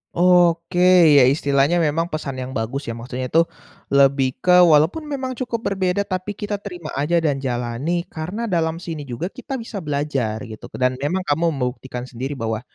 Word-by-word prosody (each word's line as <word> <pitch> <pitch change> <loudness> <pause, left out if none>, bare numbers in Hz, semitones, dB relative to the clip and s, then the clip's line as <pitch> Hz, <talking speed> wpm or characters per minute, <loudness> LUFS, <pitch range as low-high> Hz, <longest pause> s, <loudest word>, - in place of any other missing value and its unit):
Oke, 175 -1 +3 0.4
ya 130 - +7
istilahnya 140 +4 +2
memang 160 +1 +1
pesan 155 -5 -5
yang 130 0 -5
bagus 135 +4 -3
ya 115 - -4
maksudnya 125 +2 -5
itu, 165 +1 +4 0.4
lebih 135 -1 +3
ke 180 0 +7
walaupun 170 - +4
memang 265 -2 -3
cukup 240 -2 -4
berbeda 190 +1 0
tapi 185 +2 -4
kita 205 -1 -4
terima 175 -6 -7
aja 150 +5 +1
dan 150 -5 0
jalani 130 +7 -2
karena 180 +9 -5
dalam 165 -5 0
sini 160 -5 -7
juga 120 +8 -4
kita 265 +1 -5
bisa 225 -4 -6
belajar 140 -7 -2
gitu 110 -2 -10
ke - - -9
dan 130 0 +2
memang 180 +6 -1
kamu 165 +2 +1
membuktikan 125 -1 -4
sendiri 130 +3 -6
bahwa, 110 -1 -2
155 Hz, 175 wpm, -21 LUFS, 130-180 Hz, 0.4 s, ya